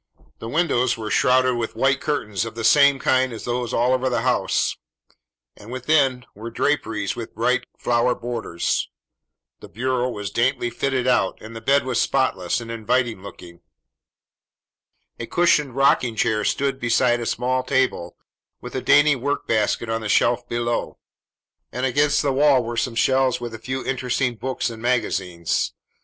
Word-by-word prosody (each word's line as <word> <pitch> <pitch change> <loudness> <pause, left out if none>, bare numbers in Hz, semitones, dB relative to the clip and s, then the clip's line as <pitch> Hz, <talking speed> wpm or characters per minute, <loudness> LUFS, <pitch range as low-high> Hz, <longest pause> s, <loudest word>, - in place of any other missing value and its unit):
The 115 - -7
windows 130 -5 +1
were 110 -1 -5
shrouded 130 -1 +3
with 115 -1 -4
white 135 0 +1
curtains 105 -9 -2
of 115 -1 -7
the 115 - -5
same 140 +4 +5
kind 130 0 +1
as 115 - -8
those 120 -1 -2
all 125 +2 +2
over 130 0 0
the 120 -2 -1
house, 125 -1 +1 0.8
and 105 +4 -13
within 130 -1 +1
were 110 +3 -8
draperies 115 -6 -1
with 115 -2 -8
bright 125 +2 +1
flower 120 +1 +1
borders. 115 -8 -3 0.7
The - - -12
bureau 125 +2 -1
was 105 -4 -5
daintily 120 0 0
fitted 130 +1 -1
out, 125 -7 +1
and 110 +1 -11
the 115 - -7
bed 140 +4 +2
was 125 -2 0
spotless 130 -10 0
and 115 -1 -8
inviting 115 -1 -1
looking. 90 -3 -12 1.6
A 115 - -5
cushioned 150 -7 +2
rocking 125 -3 +2
chair 110 -1 +1
stood 135 -1 0
beside 120 0 +2
a 120 - -4
small 130 +2 0
table, 130 -9 -1 0.4
with - - -9
a - - -2
dainty 145 0 +5
work 140 +3 -2
basket 110 +1 0
on 115 0 -2
the 110 - -4
shelf 120 +3 +2
below; 120 0 -2 0.7
and 125 +1 -2
against 145 +3 +2
the 140 -2 +1
wall 140 -2 +4
were 120 +1 -5
some 115 0 -2
shelves 130 +1 +2
with 120 -1 -6
a 110 - -7
few 130 +3 -4
interesting 125 -1 -1
books 130 +1 -3
and 110 -1 -10
magazines. 95 -8 -1
125 Hz, 165 wpm, -22 LUFS, 115-130 Hz, 1.6 s, same